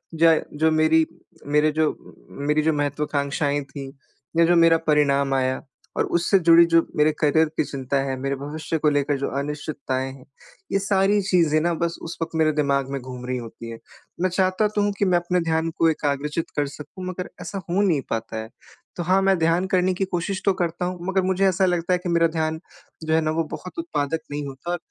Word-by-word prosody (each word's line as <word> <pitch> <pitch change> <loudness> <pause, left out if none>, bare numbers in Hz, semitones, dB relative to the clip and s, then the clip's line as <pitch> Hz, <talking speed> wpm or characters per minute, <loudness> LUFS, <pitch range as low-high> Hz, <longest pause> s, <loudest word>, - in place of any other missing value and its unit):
ज 165 0 +5 0.2
जो 160 +1 +2
मेरी 155 0 +4 0.4
मेरे 150 +2 +3
जो 155 0 +2 0.4
म 140 - -8
मेरी 150 +1 +3
जो 160 0 +2
महत्वकांक्षाएँ 145 0 -1
थीं 135 -2 -7 0.5
या 170 - +6
जो 175 +1 +4
मेरा 165 -1 +6
परिणाम 140 -2 +3
आया 130 -1 0 0.4
और - - +2
उससे 175 +3 +2
जुड़ी 170 0 +7
जो 165 0 +6
मेरे 150 +1 +4
करियर 155 +2 +4
की - - +3
चिंता 135 -1 -2
है 135 -1 -2
मेरे 135 +1 -1
भविष्य 150 +4 -4
को 150 - +3
लेकर 145 -1 +1
जो 140 - -2
अनिश्चितताएँ 140 -2 -3
हैं 130 -1 -14 0.5
ये 195 - +2
सारी 195 0 +2
चीज़ें 170 -5 +3
न 170 0 +1
बस 170 0 -1
उस 165 - -7
वक़्त 165 0 -3
मेरे 155 -1 +3
दिमाग 140 -2 +1
में 140 - -2
घूम 125 0 -8
रही 125 0 -1
होती 115 -1 -8
हैं। 115 0 -8 0.4
मैं 185 - +2
चाहता 185 +3 +1
तो 210 0 -1
हूँ 205 - +1
कि 200 - +3
मैं 180 -2 +3
अपने 180 +1 0
ध्यान 160 0 0
को 165 - +4
एकाग्रचित 150 +1 -2
कर 145 -1 +1
सकूँ 150 +6 -9
मगर 185 0 -5
ऐसा 195 -2 -5
हो 185 +4 +2
नहीं 170 -8 +2
पाता 110 0 -3
है। 110 0 -6 0.5
तो 175 - -3
हाँ, 185 +3 +3
मैं 195 -1 +3
ध्यान 165 +3 +2
करने 185 0 +2
की 195 +1 -1
कोशिश 190 +2 -3
तो 195 - +4
करता 175 +1 -1
हूँ 180 -1 -4
मगर 190 0 +2
मुझे 190 +1 +2
ऐसा 190 0 +2
लगता 175 0 +1
है 180 - +2
कि 180 - -2
मेरा 170 -1 +4
ध्यान 160 0 -2 0.4
जो 160 0 0
है 160 - +4
न 155 - -1
वो 165 - +2
बहुत 185 - -9
उत्पादक 165 - -2
नहीं 145 0 -3
होता, 140 +6 -4
160 Hz, 215 wpm, -23 LUFS, 145-180 Hz, 0.5 s, जुड़ी